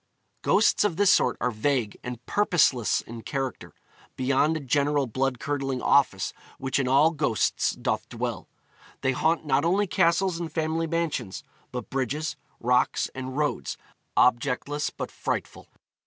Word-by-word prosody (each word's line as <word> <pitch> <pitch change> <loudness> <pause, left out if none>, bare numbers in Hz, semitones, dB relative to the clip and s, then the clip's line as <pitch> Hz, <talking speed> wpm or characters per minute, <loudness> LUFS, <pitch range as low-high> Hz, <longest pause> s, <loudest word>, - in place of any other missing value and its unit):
Ghosts 215 - +3
of 195 -6 0
this 200 -1 +5
sort - - +2
are 125 - 0
vague 115 -1 0
and 125 0 -7
purposeless 165 - +2
in 115 0 -9
character, 135 +4 -4 0.4
beyond 140 +5 +2
a - - -4
general 145 +1 +1
blood 130 +1 -1
curdling 135 -1 -2
office 125 -9 +2 0.2
which 135 +1 -1
in 135 - 0
all 140 +5 +5
ghosts 145 -8 +1
doth - - -2
dwell. - - -4 0.5
They 130 - +2
haunt 160 +5 +1
not 140 0 +2
only 190 +5 +2
castles 180 -1 +2
and 170 -2 -4
family 160 +1 -1
mansions, 155 - -2 0.3
but 125 - -6
bridges, 140 +4 -2 0.2
rocks, 125 +1 +1
and 130 +1 -6
roads, 150 -1 -1 0.4
objectless 130 +4 +2
but - - -6
frightful. - - -4
140 Hz, 140 wpm, -26 LUFS, 125-160 Hz, 0.5 s, this